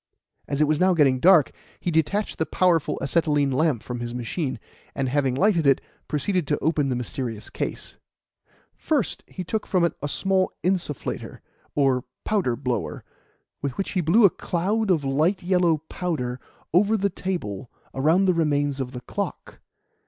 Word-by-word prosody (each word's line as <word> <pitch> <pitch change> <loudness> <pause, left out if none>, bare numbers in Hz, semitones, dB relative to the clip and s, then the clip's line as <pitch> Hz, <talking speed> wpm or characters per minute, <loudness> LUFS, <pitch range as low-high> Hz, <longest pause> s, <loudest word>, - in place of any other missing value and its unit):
As 140 +1 -1
it - - +7
was 155 0 +1
now 185 0 +4
getting 135 -5 +4
dark, 175 -1 +6 0.3
he 175 - -2
detached 170 +6 0
the 160 - +1
powerful 175 -4 +2
acetylene 145 -2 +2
lamp 135 -3 +1
from 125 -1 -5
his 120 0 -5
machine, 130 +1 -3 0.4
and, 135 -1 -1
having 135 -1 +1
lighted 170 -1 +3
it, 135 - +5 0.3
proceeded 165 +2 -1
to 150 - +1
open 150 -3 +1
the 125 - 0
mysterious 120 -2 -4
case. - - -5 0.8
First 290 - -1
he 185 - -6
took 215 +4 -3
from 185 -3 +2
it 170 - +2
a 145 - -2
small 190 +5 +1
insufflator, 175 -6 -2 0.3
or 135 -3 +2 0.2
powder 190 - +1
blower, 120 - -3 0.6
with 140 -3 -3
which 195 - -2
he 185 - 0
blew 200 +8 +5
a 195 - +6
cloud 200 +5 -1
of 165 -6 +3
light 155 +9 +1
yellow 175 -4 +2
powder 130 -9 -3 0.3
over 205 +5 +4
the 200 -1 0
table 135 - -4 0.2
around 160 +8 +3
the 185 - +4
remains 145 -4 +1
of 130 0 -4
the 125 - -6
clock. - - -5
155 Hz, 165 wpm, -24 LUFS, 135-185 Hz, 0.8 s, it